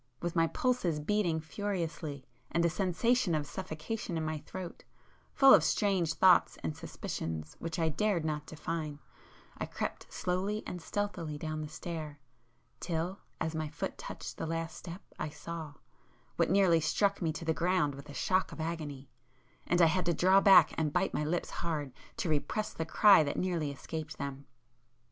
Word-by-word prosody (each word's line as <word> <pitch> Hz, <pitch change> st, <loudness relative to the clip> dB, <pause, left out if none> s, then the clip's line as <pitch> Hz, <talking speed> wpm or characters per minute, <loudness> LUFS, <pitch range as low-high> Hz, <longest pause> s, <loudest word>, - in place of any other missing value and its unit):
With 175 Hz, 0 st, -3 dB
my 165 Hz, -1 st, +4 dB
pulses 190 Hz, -9 st, 0 dB
beating 175 Hz, 0 st, +1 dB
furiously, 160 Hz, -5 st, -4 dB, 0.2 s
and 170 Hz, +1 st, +1 dB
a 170 Hz, -, +3 dB
sensation 200 Hz, +2 st, +2 dB
of 150 Hz, -1 st, -1 dB
suffocation 180 Hz, +4 st, -4 dB
in 160 Hz, -, -1 dB
my 155 Hz, -1 st, -2 dB
throat,—full 185 Hz, -, +1 dB
of -, -, +7 dB
strange 185 Hz, -6 st, +1 dB
thoughts 180 Hz, -10 st, +5 dB
and 80 Hz, -2 st, -2 dB
suspicions 80 Hz, -1 st, -5 dB
which 165 Hz, +1 st, -4 dB
I 165 Hz, -2 st, +2 dB
dared 175 Hz, 0 st, 0 dB
not 150 Hz, -1 st, -2 dB
define, 155 Hz, -1 st, -4 dB, 0.6 s
I -, -, -2 dB
crept -, -, -5 dB
slowly 195 Hz, +4 st, -1 dB
and 180 Hz, -, -5 dB
stealthily 180 Hz, -6 st, -3 dB
down 155 Hz, 0 st, -4 dB
the 155 Hz, -, -4 dB
stair, 155 Hz, -2 st, -6 dB, 0.6 s
till 175 Hz, +3 st, -2 dB, 0.2 s
as 160 Hz, -, -1 dB
my 155 Hz, -1 st, -2 dB
foot 145 Hz, -, -5 dB
touched -, -, -7 dB
the -, -, -3 dB
last 165 Hz, 0 st, -3 dB
step 175 Hz, +2 st, -8 dB, 0.2 s
I 155 Hz, -, -2 dB
saw—what 160 Hz, -1 st, -6 dB
nearly 185 Hz, -3 st, +5 dB
struck 200 Hz, +6 st, +1 dB
me 165 Hz, -2 st, +1 dB
to 165 Hz, -, -6 dB
the 160 Hz, -, +2 dB
ground 170 Hz, -3 st, +1 dB
with 140 Hz, +2 st, -11 dB
a -, -, -8 dB
shock 185 Hz, -2 st, +1 dB
of -, -, -9 dB
agony—and 135 Hz, -2 st, -4 dB
I -, -, +9 dB
had 175 Hz, +2 st, +1 dB
to 170 Hz, -, +3 dB
draw 190 Hz, +4 st, +5 dB
back 195 Hz, -2 st, +7 dB
and 155 Hz, -2 st, +1 dB
bite 180 Hz, +5 st, +1 dB
my -, -, 0 dB
lips 165 Hz, +3 st, -1 dB
hard 150 Hz, -6 st, -2 dB, 0.2 s
to -, -, -1 dB
repress 160 Hz, +7 st, -1 dB
the 160 Hz, -, -3 dB
cry 200 Hz, +1 st, +7 dB
that 145 Hz, -, -3 dB
nearly 175 Hz, -5 st, 0 dB
escaped 155 Hz, +2 st, -6 dB
them. 140 Hz, 0 st, -5 dB
165 Hz, 165 wpm, -32 LUFS, 150-185 Hz, 0.6 s, I